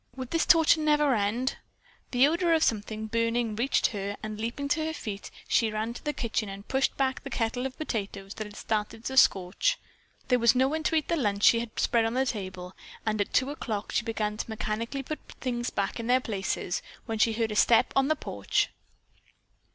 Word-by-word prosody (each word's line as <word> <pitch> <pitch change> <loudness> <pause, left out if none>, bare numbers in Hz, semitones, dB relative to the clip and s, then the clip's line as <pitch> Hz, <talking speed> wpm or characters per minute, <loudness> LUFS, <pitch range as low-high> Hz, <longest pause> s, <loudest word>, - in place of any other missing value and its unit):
Would 260 -2 -6
this 330 - +1
torture 325 -1 +6
never 300 -2 +3
end? 230 +4 0 0.5
The 250 +1 +5
odor 335 +2 +2
of 320 - +2
something 215 0 -1
burning 230 0 0
reached 245 +5 +1
her 200 0 -3
and, 215 0 -5
leaping 240 +5 -3
to 310 +2 +1
her 320 0 -2
feet, 205 -9 -6 0.2
she 225 - +3
ran 215 +2 -2
to - - -10
the 295 - 0
kitchen 230 -6 -2
and 195 +1 -9
pushed 265 0 +1
back 265 -1 0
the 275 - -6
kettle 245 +1 -1
of 260 - -12
potatoes 200 -8 -4
that 215 - -5
had 205 - -13
started 220 +1 -3
to 265 - -3
scorch. 230 - +3 0.5
There 250 -1 +4
was 235 +1 +5
no 260 +1 +4
one 315 +3 -1
to - - +2
eat 310 -2 +1
the 335 - +1
lunch 205 -8 0
she 230 - +7
had 230 -1 -5
spread 230 -1 +3
on 225 +2 -1
the 265 +1 +2
table 185 -6 -5 0.3
and 215 -1 0
at 205 - -2
two 260 +2 +2
o'clock 220 -8 -4
she - - +1
began 215 -2 -2
to - - -4
mechanically 225 +5 -3
put 305 +2 -5 0.2
things 240 -2 -2
back 200 +3 -2
in 230 - -4
their 250 +1 +4
places, 195 -6 -2 0.2
when 225 -2 -3
she 225 0 +4
heard 225 0 -1
a - - -3
step 230 +2 +4
on 270 0 +4
the 310 - +2
porch. - - -1
230 Hz, 215 wpm, -28 LUFS, 215-265 Hz, 0.5 s, she